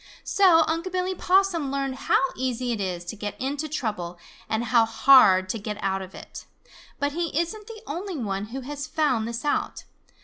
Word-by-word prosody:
So 360 -5 +5
Unc' 330 +3 -2
Billy 370 +1 -1
Possum 365 -6 +2
learned 275 -1 -1 0.2
how - - +6 0.2
easy 250 -1 -2
it 220 -3 -2
is 180 -2 -3
to 175 - -6
get 205 -1 -6
into 285 +4 -3
trouble 210 - -3 0.3
and 220 +1 0
how 235 0 +4
hard 225 -5 +6
to 225 - -2
get 210 0 -5
out 195 -1 -1
of 190 0 -10
it. - - -10 0.5
But 285 0 -1
he 330 -1 -1
isn't 410 +5 -3
the 455 -1 -10
only 355 +3 -5
one 200 -5 -3
who 255 +5 -6
has 285 +3 -6
found 260 -8 0
this 235 +3 -5
out. 295 - -1
270 Hz, 190 wpm, -25 LUFS, 220-330 Hz, 0.5 s, how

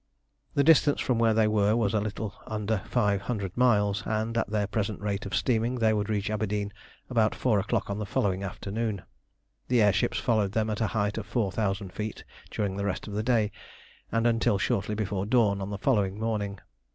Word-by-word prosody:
The 140 - +4
distance 150 -1 +5
from 125 -3 0
where 115 -1 +3
they 110 -1 +4
were 105 0 +3
was 110 -4 +1
a 110 - +3
little 105 0 -4
under 110 -1 -1
five 105 -5 +2
hundred 100 -3 -3
miles, 105 -5 +3
and 110 +1 -1
at 115 - 0
their 105 -1 0
present 105 0 -2
rate 100 0 -2
of 100 - -3
steaming 120 0 +1
they 110 -3 +2
would 105 0 -1
reach 105 -1 -1
Aberdeen 105 -1 -2 0.3
about 115 -4 +2
four 110 -5 +2
o'clock 100 - -1
on 100 +1 -3
the 105 - -2
following 95 -1 0
afternoon. 100 +2 -3 0.6
The 125 -1 +3
air 105 -1 +5
ships 95 -1 0
followed 105 0 +1
them 110 0 0
at 105 - -3
a 110 - +2
height 105 +1 0
of 105 - -7
four 110 -6 0
thousand 100 -2 -2
feet 105 0 -5 0.3
during 100 -2 -2
the 100 - -2
rest 100 +1 -3
of 105 - -6
the 105 - 0
day 110 -2 +2 0.6
and 115 0 +1
until 115 -3 +3
shortly 100 +2 0
before 100 -2 -2
dawn 105 -4 +3
on 95 - -4
the 100 - -4
following 100 -4 +1
morning. 105 -3 -2
105 Hz, 205 wpm, -28 LUFS, 100-115 Hz, 0.6 s, distance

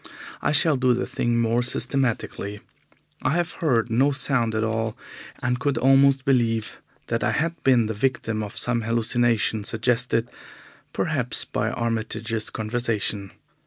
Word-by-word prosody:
I - - +1
shall 150 0 +4
do 125 -1 +2
the 125 - -2
thing 120 0 -1
more 115 +1 +2
systematically. 120 -5 -1 0.6
I - - +1
have 175 0 0
heard 120 -7 +1
no 130 +5 +3
sound 125 -4 +1
at 110 - 0
all, 110 0 -2 0.5
and 125 -1 0
could 140 -1 0
almost 135 +2 +4
believe 115 -5 +1 0.3
that - - -2
I - - +2
had 165 +2 -2
been 125 -4 +4
the 110 - -2
victim 115 -1 -1
of 105 -1 -7
some 120 -1 +1
hallucination 115 -1 +1
suggested, 115 +1 +1 0.6
perhaps, - - 0
by - - -2
Armitage's 115 -1 -2
conversation. 110 -3 -2
120 Hz, 140 wpm, -24 LUFS, 110-130 Hz, 0.6 s, shall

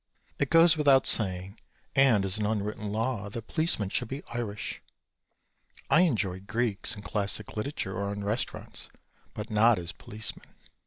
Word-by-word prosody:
It 140 - +1
goes 165 0 +6
without 140 -3 +4
saying 95 -1 +4 0.4
and 130 -8 +4
is 95 +2 +1
an 105 - -1
unwritten 105 -1 -3
law 110 -1 -2
that 115 +2 -7
policemen 155 - 0
should - - -1
be 135 +5 -6
Irish. 105 -3 -4 1.1
I 170 - +6
enjoy 105 - 0
Greeks 105 +2 -1
in 100 - -10
classic 100 +1 -2
literature 105 -4 -3
or 100 0 -3
in 100 0 -5
restaurants, 105 +5 -4 0.5
but 105 +2 -6
not 110 +1 +4
as 85 -1 -5
policemen. 110 +1 -3
105 Hz, 150 wpm, -28 LUFS, 100-120 Hz, 1.1 s, goes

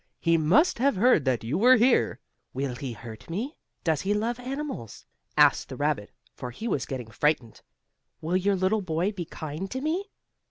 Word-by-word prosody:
"He 165 -1 +3
must 185 - +3
have 275 -1 +3
heard 190 - +4
that 130 -4 +1
you 125 +10 -1
were 250 +4 +7
here." 250 +2 +3 0.4
"Will 135 -1 -2
he 125 0 -5
hurt 110 +2 -11
me? 230 - -3 0.3
Does 160 -5 +1
he 205 +2 0
love 230 +3 -1
animals?" 260 - -6 0.3
asked - - +5
the - - -6
rabbit, - - -1 0.2
for 125 - -6
he 175 - -6
was 140 - -1
getting 125 -4 -5
frightened. 130 -4 0 0.6
"Will 165 +3 -2
your 195 +2 +2
little 190 +3 +1
boy 175 +2 0
be 185 -5 -5
kind 155 +5 -6
to 260 - -3
me?" 320 +8 -1
180 Hz, 185 wpm, -27 LUFS, -, 0.6 s, were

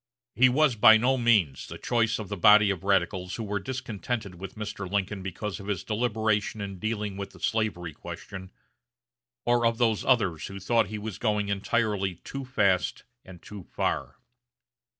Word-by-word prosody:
He 130 +1 +5
was 135 0 +3
by 110 0 +8
no 125 +4 +2
means 110 - +2
the - - -8
choice 115 -2 +1
of 110 - -6
the 100 - -4
body 105 +2 +6
of 95 -3 -5
radicals 95 -1 0
who 115 - -4
were 105 -1 -2
discontented 120 -3 -4
with 95 +1 -9
Mr. 105 -3 -5
Lincoln 100 0 -1
because 95 +3 -5
of 100 - -10
his 100 -4 -2
deliberation 110 -2 0
in 100 -2 -6
dealing 105 -1 -3
with 100 0 -6
the - - -15
slavery 100 -7 -1
question, 95 +5 -9 1.0
or 120 0 +2
of 115 -1 +2
those 115 -3 +1
others 100 - +1
who 100 0 -8
thought 115 +2 +2
he 105 +2 -5
was 105 -1 -6
going 105 -3 0
entirely 100 -1 0
too 135 +10 -7
fast 100 -8 +1 0.2
and 90 -2 -13
too 105 -1 -9
far. - - -3
105 Hz, 170 wpm, -27 LUFS, 95-115 Hz, 1.0 s, by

